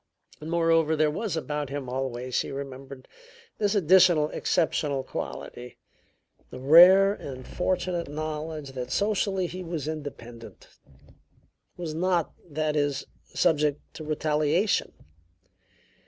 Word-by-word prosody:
Moreover, 165 0 +2
there 155 -1 +2
was 195 +1 -3
about 150 -3 -3
him 140 -2 -5
always, 125 -1 -4
she - - 0
remembered, 135 -1 -8 0.5
this 205 0 +1
additional 175 -4 +5
exceptional 145 -5 0
quality: 125 -1 -7 0.7
the - - -9
rare 180 +9 +7
and 130 -9 -9
fortunate 180 -1 -2
knowledge 155 -1 -5
that 125 -2 -6
socially 200 -2 0
he 180 +2 -6
was 165 -4 -4
independent; 125 -7 -8 1.1
was 170 -3 -5
not, 175 0 0 0.2
that 155 0 -1
is, 145 -2 0 0.3
subject 150 -2 +2
to 155 - -8
retaliation. 155 +5 0
155 Hz, 110 wpm, -26 LUFS, 140-175 Hz, 1.1 s, rare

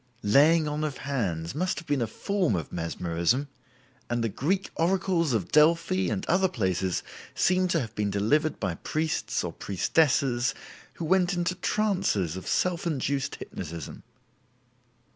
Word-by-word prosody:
"Laying 150 +9 +5
on 150 +1 -2
of 150 -3 -2
hands" 95 - -2
must 180 +6 -1
have 165 - -7
been 145 -3 +1
a 115 - 0
form 185 - 0
of 80 -4 -4
mesmerism, 85 - -1 0.6
and 115 -3 -1
Greek 185 +8 0
oracles 170 -2 +1
of 110 -7 -1
Delphi 170 +5 +3
and 190 - -2
other 190 +2 +3
places 95 - -1 0.3
seem 185 0 +3
to 175 -2 +1
have 115 -6 -5
been 105 -2 -1
delivered 140 +11 +1
by 95 -5 -1
priests 155 - -2
or - - -4
priestesses 130 - +1 0.4
who 165 - -5
went 180 +2 +2
into 175 +1 0
trances 180 - 0
of 95 - -7
self 175 -1 0
induced 140 -3 -1
hypnotism. 80 -1 -7
145 Hz, 145 wpm, -27 LUFS, 105-175 Hz, 0.6 s, Laying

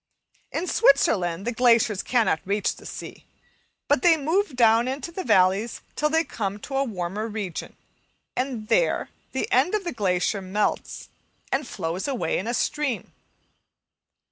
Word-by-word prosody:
In 335 - -2
Switzerland 195 - +3
the 240 - 0
glaciers 230 -4 +3
cannot 230 -9 +2
reach 200 +1 0
the - - -11
sea, - - -8 0.6
but 290 -3 +3
they 335 -2 +5
move 320 +2 0
down 230 0 +4
into 270 +5 -4
the 370 +2 -5
valleys 190 - +2
till 300 - +1
they 320 +1 +2
come 200 -9 -4
to 270 - -6
a 275 - +3
warmer 205 -2 -3
region, 210 -6 -5 0.6
and 250 -4 -3
there - - +2 0.2
the - - -1
end 365 - +3
of 420 - -1
the 345 - -3
glacier 195 -2 0
melts, 195 +3 -2 0.4
and 270 -1 0
flows 175 - -3
away 240 - -1
in 190 - -5
a 240 - -1
stream. 295 -5 -1
230 Hz, 150 wpm, -25 LUFS, 195-280 Hz, 0.6 s, they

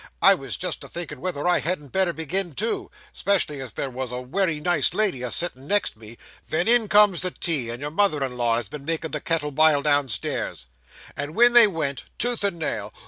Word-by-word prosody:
I 195 - +7
was 135 -8 -4
just 180 -2 -3
a - - -8
thinkin' 175 -1 -7
whether 175 -4 -3
I 180 - +3
hadn't 155 -4 -2
better 190 +4 +1
begin 170 +1 -2
too 225 +3 -2 0.2
'specially 165 -8 -1
as 130 -4 -6
there 135 - -4
was 130 0 -5
a 125 - -4
wery 160 +5 -1
nice 170 0 +1
lady 200 -11 +1
a 125 - -3
sittin' 140 -2 0
next 205 +2 +1
me 110 +1 -12 0.3
ven 175 +5 -1
in 235 -2 +5
comes 205 -3 +4
the 185 - 0
tea, 150 -9 -2
and 120 +1 -5
your 145 +1 -5
mother 160 -5 +1
in 130 -2 -4
law, 120 -2 0
as 120 -1 -2
had 100 - -15
been 145 -2 -8
makin' 160 0 -2
the - - -3
kettle 155 -3 -1
bile 150 0 +3
downstairs. 140 - -1 0.5
At 145 0 -4
it 240 +9 +5
they 240 -2 +9
went, 150 -8 -3
tooth 240 -2 -2
and 200 -4 0
nail. 110 -10 -4
155 Hz, 220 wpm, -23 LUFS, 135-185 Hz, 0.5 s, they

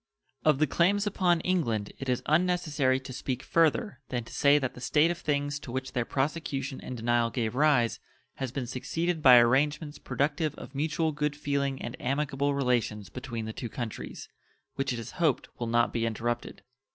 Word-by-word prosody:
Of 155 -3 +4
the 155 - +3
claims 190 +8 +2
upon 180 -4 +2
England 120 - 0
it 135 - -4
is 125 - 0
unnecessary 155 -5 +2
to 130 0 -8
speak 130 0 -3
further 165 - +2
than 120 -2 -2
to - - -13
say 145 +1 +5
that 130 -3 -1
the 125 - -11
state 155 +5 +3
of 175 - -5
things 145 -1 -1
to 140 -4 -9
which 130 +1 -4
their 120 -1 0
prosecution 135 -1 -2
and 125 - -6
denial 120 0 +2
gave 115 -2 -2
rise 135 -4 +3 0.4
has 130 -3 -3
been 130 -1 -3
succeeded 165 +7 -2
by 125 -4 +9
arrangements 145 +5 +2
productive 150 +1 -1
of - - -10
mutual 155 +3 0
good 150 0 -1
feeling 140 -2 -1
and 120 - -5
amicable 140 +1 0
relations 120 -6 0
between 120 -1 -5
the 110 - -5
two 120 -1 -5
countries, 115 -1 -6 0.5
which 135 -1 -1
it 120 - -2
is 115 - -6
hoped 155 -7 +2
will 120 - -2
not 120 +1 +2
be 115 0 0
interrupted. 120 +2 -3
135 Hz, 185 wpm, -29 LUFS, 120-150 Hz, 0.5 s, by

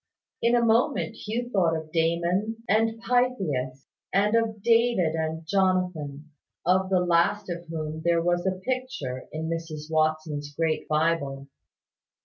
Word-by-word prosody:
In 235 +1 +3
a 235 -1 +3
moment 230 +2 +2
Hugh 235 +3 -4
thought 175 -6 +2
of 160 -1 -6
Damon 175 +7 0
and 225 +2 +2
Pythias, 170 - 0 0.3
and 205 +2 +2
of 220 -3 0
David 230 -8 +3
and 160 0 -3
Jonathan, 180 -6 0 0.3
of 185 +2 +3
the 185 -2 +3
last 180 +3 +2
of 170 0 -6
whom 155 -1 -4
there 170 0 +3
was 175 +2 0
a 185 0 -1
picture 255 - -3
in 160 +1 -4
Mrs 160 -2 -5
Watson's 155 -2 0
great 160 0 0
Bible. 150 -3 0
170 Hz, 135 wpm, -26 LUFS, 155-215 Hz, 0.3 s, In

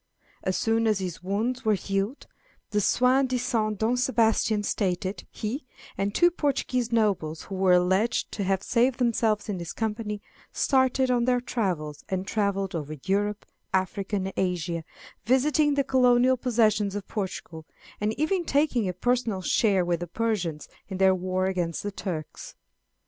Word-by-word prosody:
As 185 - -1
soon 225 0 +1
as 215 -2 +3
his 185 -3 -5
wounds 215 +7 -1
were 215 -1 +3
healed, 195 +6 -2 0.5
the 210 0 +2
soi 255 +6 +3
disant 245 -5 0
Don 225 +4 +1
Sebastian 225 -4 +2
stated, 190 -1 -2
he, 235 +8 -4 0.3
and 200 +1 -2
two 345 0 +5
Portuguese 255 -6 -1
nobles 195 -9 0
who 195 - -9
were 190 -1 +3
alleged 190 +6 +2
to 205 - -3
have 195 0 0
saved 245 +1 +2
themselves 225 -3 +1
in 200 -4 -3
his 170 -1 -6
company, 215 -1 -3 0.3
started 260 -1 +2
on 240 -1 +2
their 250 0 +3
travels, 180 - -3
and 190 0 -2
travelled 200 -2 -1
over 155 -2 -4
Europe, 205 +2 0 0.3
Africa, 190 +2 -1
and 195 -1 -2
Asia, 175 -2 -1 0.4
visiting 290 +4 +3
the 280 - +2
colonial 255 -1 +4
possessions 215 -5 +1
of 205 -2 -5
Portugal, 180 -6 -5 0.3
and 210 +1 -1
even 345 +4 +1
taking 275 - +1
a - - -2
personal 225 -1 0
share 195 -2 +2
with 175 -1 0
the 175 - -5
Persians 180 -6 -2 0.2
in 190 - -4
their 190 0 +5
war 185 0 -1
against 175 -3 -2
the 205 - -3
Turks. 170 -6 -6
210 Hz, 155 wpm, -26 LUFS, 185-245 Hz, 0.5 s, two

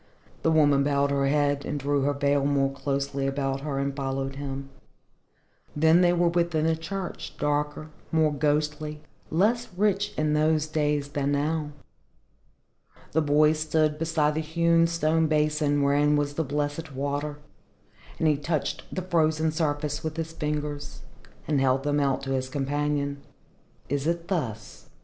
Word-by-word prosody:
The - - +2
woman 145 -3 +4
bowed 140 0 +1
her 140 -1 +1
head 145 0 +1
and 145 - -3
drew 140 +1 0
her 145 +1 +1
veil 140 0 +1
more 140 -1 +2
closely 140 0 -2
about 135 0 -1
her 140 -1 -3
and 140 0 -1
followed 135 0 -3
him. 135 -1 -5 1.0
Then 160 +3 +5
they 175 -1 +5
were 175 -1 +3
within 170 -2 +1
the 160 0 +2
church, 185 +3 -6
darker, 150 +1 -1 0.2
more 155 -2 +3
ghostly, 150 +1 -1 0.3
less 220 +8 +2
rich 205 +1 +1
in 155 0 +1
those 155 0 +2
days 150 -2 0
than 145 -1 -1
now. 150 +1 0 1.4
The 160 - +2
boy 150 +1 +4
stood 155 -1 0
beside 155 -2 +1
the 155 - -1
hewn 165 +1 +2
stone 160 -1 +1
basin 150 -1 +1
wherein 145 +1 +3
was 145 -1 0
the 160 - -1
blessed 145 +1 -3
water, 145 +2 -2 0.8
and 160 - +1
he 150 -2 +3
touched 150 0 -2
the 185 - -3
frozen 160 -3 +1
surface 150 -1 -1
with 160 0 -4
his 165 0 -4
fingers, 150 -2 -4 0.4
and 145 -3 +2
held 135 0 +2
them 145 0 +1
out 135 -1 0
to 135 - -3
his 130 -1 -1
companion. 140 +1 -1 0.7
"Is 140 +1 -1
it 170 0 -2
thus?" 120 - -4
150 Hz, 155 wpm, -26 LUFS, 140-160 Hz, 1.4 s, Then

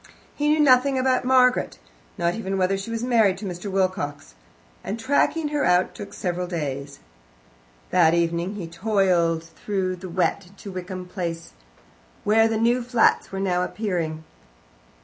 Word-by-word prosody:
He 295 - -1
knew 305 +1 +3
nothing 270 -1 +4
about 255 -1 +1
Margaret, 250 - +3 0.4
not 170 0 +1
even 195 -2 -3
whether 190 +1 +2
she 195 +3 -6
was 230 0 -3
married 225 -6 +3
to 205 - -7
Mr. 180 +1 -5
Wilcox, 185 - -2 0.5
and 215 +4 -4
tracking 285 +5 +1
her 295 -1 -1
out 180 +1 +2
took 205 - -9
several 180 -1 -2
days. 145 -5 -4 0.9
That 170 -2 +4
evening 170 +3 0
he 195 -4 -5
toiled 175 -3 +1
through 185 +2 -3
the 185 +1 -8
wet 185 +2 0
to 200 - -9
Wickham 185 0 -6
Place, 170 -2 -5 0.7
where 225 +2 +4
the 225 0 -1
new 235 +3 +2
flats 240 -1 +2
were 195 - -4
now 180 -2 0
appearing. 175 -6 -3
190 Hz, 150 wpm, -24 LUFS, 175-225 Hz, 0.9 s, nothing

